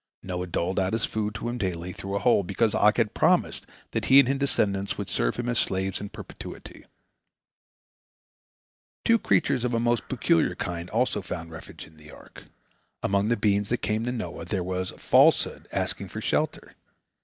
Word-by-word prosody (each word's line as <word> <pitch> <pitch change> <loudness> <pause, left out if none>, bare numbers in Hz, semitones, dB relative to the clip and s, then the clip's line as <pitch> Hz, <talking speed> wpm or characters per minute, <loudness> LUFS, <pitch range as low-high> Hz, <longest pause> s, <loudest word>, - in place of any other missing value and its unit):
Noah 90 -1 -4
doled 90 +2 -1
out 95 +1 0
his 115 -1 +1
food 105 -1 -3
to - - -4
him 120 +1 -3
daily, 90 -2 -3
through 100 +2 -5
a - - +2
hole, 120 0 +3
because 100 +4 0
Og 105 0 +4
had 115 -3 +1
promised - - +2 0.2
that - - -2
he 135 - +6
and 140 - +5
his 135 +1 0
descendants 100 -8 0
would - - -4
serve - - 0
him 120 0 -3
as 120 -2 0
slaves 95 0 -1
in 105 - -5
perpetuity. - - -10 2.2
Two 230 0 +5
creatures 125 - +1
of 125 -1 0
a - - +2
most 120 0 0
peculiar 100 -9 +2
kind 85 0 -4
also 115 -2 0
found 85 -3 -6
refuge 80 - -10
in 80 0 -19
the 75 0 -15
ark. - - -14 0.6
Among 100 +1 +1
the 120 - +2
beings 100 -1 +1
that 120 - -1
came 110 +1 0
to 125 - -1
Noah 100 -9 -5
there 95 -4 -2
was 95 0 -2
Falsehood - - +3
asking - - -2
for - - -6
shelter. - - -1
100 Hz, 185 wpm, -26 LUFS, 90-120 Hz, 2.2 s, he